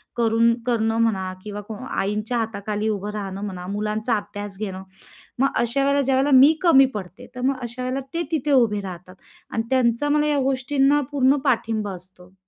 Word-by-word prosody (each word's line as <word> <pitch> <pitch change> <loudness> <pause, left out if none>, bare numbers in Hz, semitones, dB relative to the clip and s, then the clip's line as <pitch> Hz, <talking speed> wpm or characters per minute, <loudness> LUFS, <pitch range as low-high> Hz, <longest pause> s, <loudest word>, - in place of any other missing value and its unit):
करुनं 230 0 +3
करणं 225 -2 +1
म्हणा 190 -5 0
किंवा 210 -1 -6 0.4
आईंच्या 210 +4 -1
हाताखाली 215 -1 -2
उभं 205 -1 -3
राहणं 195 -2 -5
म्हणा, 185 -3 -6
मुलांचा 215 +3 -1
अभ्यास 205 -1 -7
घेणं. 190 -3 -5 0.6
मग 270 - +4
अशा 240 +4 +1
वेळेला 280 0 +3
ज्या 265 -1 +1
वेळेला 270 +2 +2
मी 285 +4 +7
कमी 295 -7 +6
पडते, 185 -3 -8
तर 250 - -6
मग 265 +1 +1
अशा 240 +1 -6
वेळेला 255 +2 -2
ते 335 +1 -1
तिथे 300 -2 0
उभे 230 -6 +3
राहतात 185 -1 -9 0.4
आणि 225 - -1
त्यांचा 255 +2 +2
मला 300 0 +2
या 295 -1 +1
गोष्टींना 270 +2 +2
पूर्ण 275 0 +3
पाठिंबा 220 -3 0
असतो. 180 0 -17
225 Hz, 175 wpm, -23 LUFS, 205-265 Hz, 0.6 s, मी